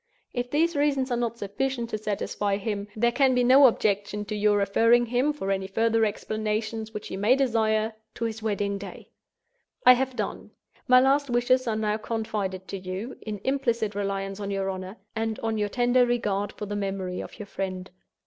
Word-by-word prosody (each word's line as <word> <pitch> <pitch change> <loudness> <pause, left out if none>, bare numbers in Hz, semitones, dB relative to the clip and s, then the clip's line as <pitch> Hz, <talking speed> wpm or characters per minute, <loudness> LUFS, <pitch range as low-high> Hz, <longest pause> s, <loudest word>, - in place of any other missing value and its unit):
If 245 0 -2
these 325 +4 +1
reasons 280 -3 +1
are - - +2
not 235 -1 -2
sufficient 235 +3 -3
to - - -1
satisfy 205 -1 -1
him, 205 0 -3
there 235 +2 +2
can 260 +1 +3
be 250 - +3
no 265 +3 +8
objection 210 -2 0
to 215 - -4
your 210 0 +3
referring 230 +4 +4
him, 250 +5 +1
for 275 -10 -3
any 190 -1 -1
further 225 +2 +2
explanations 215 +1 -3
which 210 - -7
he - - -5
may 210 +6 +4
desire, 220 -4 +1 0.2
to 230 - -2
his 225 0 -4
wedding 200 -2 -1
day. 200 - -10 0.8
"I 250 - +10
have 260 0 -1
done. - - -4 0.4
My 255 0 +7
last 275 +2 +3
wishes 245 +1 +2
are 220 - +1
now 215 -1 0
confided 210 -4 -3
to 195 - -4
you, 190 +7 -5
in 210 -2 -5
implicit 235 -6 0
reliance 195 0 -3
on 200 -1 -4
your 195 -1 -1
honor, 185 +2 -7 0.2
and 225 0 -1
on 225 -1 -1
your 205 0 0
tender 245 +2 +3
regard 210 -4 0
for 210 - -7
the 205 0 -4
memory 195 -2 -3
of - - -10
your 210 - -7
friend. 190 -2 -5
220 Hz, 190 wpm, -26 LUFS, 200-245 Hz, 0.8 s, I